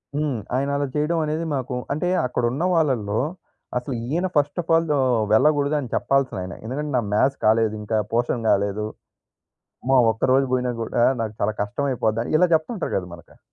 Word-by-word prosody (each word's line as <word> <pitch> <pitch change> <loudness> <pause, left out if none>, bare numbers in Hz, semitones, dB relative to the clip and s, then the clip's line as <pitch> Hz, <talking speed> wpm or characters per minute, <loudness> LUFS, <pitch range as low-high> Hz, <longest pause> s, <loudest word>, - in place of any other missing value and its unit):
హ్మ్. 145 -4 0 0.2
ఆయన 140 +2 0
అలా 145 - 0
చేయడం 150 +3 0
అనేది 155 +2 -2
మాకు 130 -1 -3 0.2
అంటే 155 +4 -2 0.2
అక్కడున్న 125 +4 -1
వాళ్ళల్లో 120 -10 +1 0.6
అసలు 125 +2 -3
ఈయన 170 +8 0
ఫస్ట్ 145 +3 +1
అఫ్ 165 - -5
ఆల్ 165 0 +2
ఆహ్, 130 -3 +2
వెళ్ళకూడదు 145 +4 +3
అని 130 -5 -6
చెప్పాల్సిన 135 -5 +1
ఆయన. 90 - -6
ఎందుకంటే 145 +5 -3
"నా - - +2
మ్యాస్ 135 +6 +3
కాలేదు 110 0 +3
ఇంకా. 110 +1 -1 0.2
పోర్షన్ 120 0 0
కాలేదు. 100 +1 +1 1.0
అమ్మొ! 130 0 +4
ఒక్క 110 - -8
రోజు 135 0 +3
పోయినా 125 -1 +1
కూడా 120 +1 0 0.2
నాకు 110 -1 -3
చాలా 105 +1 +1
కష్టం 105 +8 -2
అయిపోద్ది" 115 -3 0
అని - - -5
ఇలా 180 - +5
చెప్తుంటారు 180 +6 -3
గద 90 - -3
మనకు. 85 -1 -15
130 Hz, 175 wpm, -23 LUFS, 110-150 Hz, 1.0 s, ఇలా